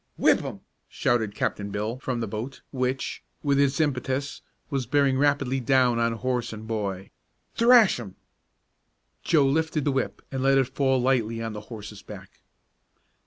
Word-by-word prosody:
"Whip - - +4
'im!" - - -6 0.3
shouted 110 -4 0
Captain 100 0 -2
Bill 105 +5 -3
from 130 -3 -3
the 115 - -2
boat, 110 +7 -6
which, 130 0 -2 0.2
with 140 -2 +2
its 140 0 +2
impetus, 140 -1 -1 0.3
was 135 -4 -1
bearing 140 0 +2
rapidly 140 -2 +2
down 125 -2 +3
on 115 0 +1
horse 120 +1 -2
and 110 0 -8
boy. 100 -4 -3 0.4
"Thrash 230 - +5
'im!" 100 -6 -8 1.1
Joe 150 -5 +4
lifted 155 +1 0
the 145 - +2
whip 135 -1 -2
and 135 -1 -3
let 135 +1 +4
it 135 -1 +1
fall 135 -2 +2
lightly 120 -3 +1
on 115 -1 -4
the 105 - -6
horse's 105 -3 -8
back. 95 -3 -12
130 Hz, 160 wpm, -26 LUFS, 110-140 Hz, 1.1 s, Thrash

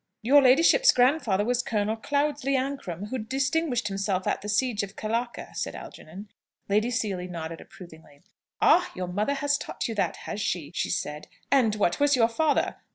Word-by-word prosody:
"Your 280 +5 +6
ladyship's 330 - +5
grandfather 245 -6 +2
was 245 +1 +1
General 215 -1 -1
Cloudesley 285 +3 -1
Ancram, 255 -9 -3
who 260 - -3
distinguished 265 +1 -1
himself 195 -1 -2
at - - -1
the 210 - -6
siege 215 +1 +1
of 200 0 -7
Khallaka," 230 +3 -4
said - - -4
Algernon. 195 +6 -10 0.4
Lady 215 +4 +1
Seely 200 -6 -2
nodded 165 -2 -6
approvingly. 160 -5 -15 0.4
"Ah, 355 - +4
your 185 - -3
mother 210 +10 -1
has 285 +1 0
taught - - -4
you 230 - -4
that, 205 - -1
has 210 - -4
she?" 160 -7 -2
she - - -2
said. 150 -3 -3 0.2
"And 245 -6 +3
what 200 -5 0
was 290 0 +4
your 230 -2 +3
father? 300 +5 0
225 Hz, 170 wpm, -26 LUFS, 195-275 Hz, 0.4 s, Your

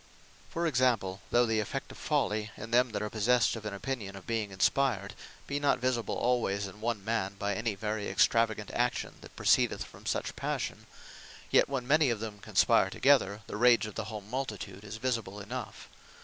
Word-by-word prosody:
(For 170 +1 -2
example,) 120 - +1
Though 120 0 +4
the 110 -1 +1
effect 105 - -4
of - - -12
folly, 105 +1 0
in 110 +2 -8
them 125 +1 +4
that 105 -2 -3
are 105 - -2
possessed 115 +3 +3
of 110 -1 -8
an 105 - -4
opinion 100 -2 -4
of 95 - -11
being 115 -3 -1
inspired, 100 +2 +1 0.3
be 140 +1 -2
not 145 -1 +3
visible 125 -2 -1
alwayes 115 -5 +1
in 100 +2 -10
one 110 -3 -2
man, 100 -3 -1
by 100 0 -1
any 110 +1 -1
very 105 +1 -3
extravagant 110 +2 +2
action, 120 0 -1
that - - -13
proceedeth - - +3
from - - -13
such - - -1
Passion; - - -3 0.6
yet - - +5
when 130 -3 -3
many 150 0 +4
of 115 -3 -1
them 105 -2 -6
conspire - - +3
together, 115 -7 +3
the - - -6
Rage 120 0 +5
of 105 - -7
the 115 - -4
whole 110 -1 -6
multitude 105 -4 -5
is 105 +1 -7
visible 110 -5 -2
enough. 120 +4 -7
110 Hz, 190 wpm, -30 LUFS, 105-125 Hz, 0.6 s, yet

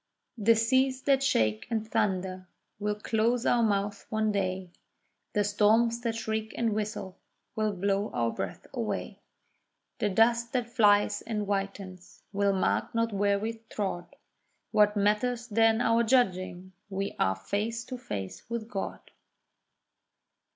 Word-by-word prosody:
The 225 +2 +5
seas 260 +3 +2
that 275 -2 +3
shake 110 - +1
and 220 -2 -2
thunder 190 -4 -1 0.3
will 210 0 -1
close 230 +3 0
our 240 - +3
mouths 205 -2 0
one 220 -1 +1
day, 185 -2 -2 0.6
The 210 - +2
storms 220 +3 +3
that 230 -2 -1
shriek 220 -1 -3
and 230 -2 +1
whistle 210 -3 -4 0.4
will 215 -1 +1
blow 200 +2 0
our 115 -1 0
breaths - - -5
away. - - -3 0.8
The 210 - +1
dust 235 +3 +3
that 240 -2 -1
flies 205 -4 +4
and 215 -2 -3
whitens 195 -2 -5
will 200 0 +2
mark 190 +4 0
not 230 -1 +1
where 200 0 +2
we 225 +2 -4
trod. 190 -4 -4 0.6
What 210 0 +4
matters 215 +4 +1
then 225 0 +3
our 230 -1 +3
judging? 185 -6 +1 0.2
we 195 0 -3
are 95 0 +2
face 215 - -3
to 255 - -6
face 100 - -5
with 235 -2 -3
God. 200 -4 -4
210 Hz, 135 wpm, -29 LUFS, 195-230 Hz, 0.8 s, The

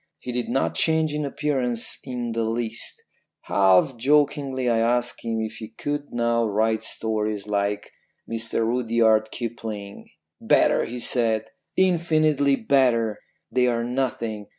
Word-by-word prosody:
He 125 - -6
did 125 0 -3
not 80 0 0
change 160 - +2
in 150 0 -2
appearance 135 -5 -1
in 125 -3 -4
the 115 0 -1
least. 115 0 -4 0.4
Half 95 +5 +3
jokingly 140 0 +1
I 115 -1 +2
asked 120 +1 0
him 115 -1 -2
if 110 -1 -5
he 110 - -7
could 145 0 -3
now 120 -1 +1
write 110 +1 +1
stories 110 -2 -2
like 100 0 -2 0.4
Mr 115 0 -1
Rudyard 115 -2 +2
Kipling. 110 -4 -6 0.3
"'Better,' - - +3
he 125 - -6
said, 110 -3 +1 0.3
'infinitely 155 -6 +3
better. 120 -7 +2 0.3
They 125 -1 +3
are 115 -1 0
nothing. 115 -4 -2
115 Hz, 130 wpm, -24 LUFS, 110-130 Hz, 0.4 s, Half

